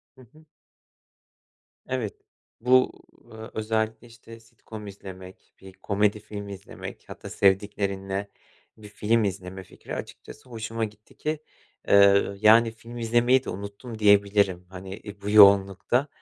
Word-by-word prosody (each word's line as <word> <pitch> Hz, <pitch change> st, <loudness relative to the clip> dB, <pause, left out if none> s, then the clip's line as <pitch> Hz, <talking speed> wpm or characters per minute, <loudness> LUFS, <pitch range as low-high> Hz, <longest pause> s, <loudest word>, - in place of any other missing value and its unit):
Hı 130 Hz, -, -17 dB
hı. 155 Hz, 0 st, -20 dB, 1.4 s
Evet. -, -, -3 dB, 0.5 s
Bu, 130 Hz, +1 st, +4 dB, 0.4 s
eee, 110 Hz, -, -11 dB, 0.2 s
özellikle, 110 Hz, +1 st, -2 dB
işte, 115 Hz, 0 st, -14 dB
sitcom 110 Hz, -2 st, -12 dB
izlemek, 95 Hz, -1 st, -12 dB
bir 95 Hz, -1 st, -13 dB
komedi 105 Hz, +1 st, 0 dB
filmi 100 Hz, -1 st, -8 dB
izlemek 100 Hz, +1 st, -10 dB
hatta -, -, -9 dB
sevdiklerinle 100 Hz, 0 st, 0 dB, 0.5 s
bir 105 Hz, -1 st, -12 dB
film 110 Hz, +2 st, +1 dB
izleme 95 Hz, -1 st, -4 dB
fikri -, -, -9 dB
açıkçası 130 Hz, -, -10 dB
hoşuma 115 Hz, -1 st, -3 dB
gitti 105 Hz, 0 st, -15 dB
ki, 155 Hz, 0 st, -2 dB, 0.5 s
eee, 100 Hz, 0 st, +5 dB
yani, 110 Hz, +2 st, +6 dB
film 115 Hz, +2 st, -12 dB
izlemeyi 120 Hz, +3 st, +3 dB
de -, -, -5 dB
unuttum 100 Hz, +4 st, -7 dB
diyebilirim, 100 Hz, -3 st, +3 dB
hani, 95 Hz, +2 st, -9 dB
e, 100 Hz, -1 st, -10 dB
bu 100 Hz, -, -4 dB
yoğunlukta 100 Hz, +5 st, +5 dB
105 Hz, 125 wpm, -25 LUFS, 100-115 Hz, 1.4 s, yani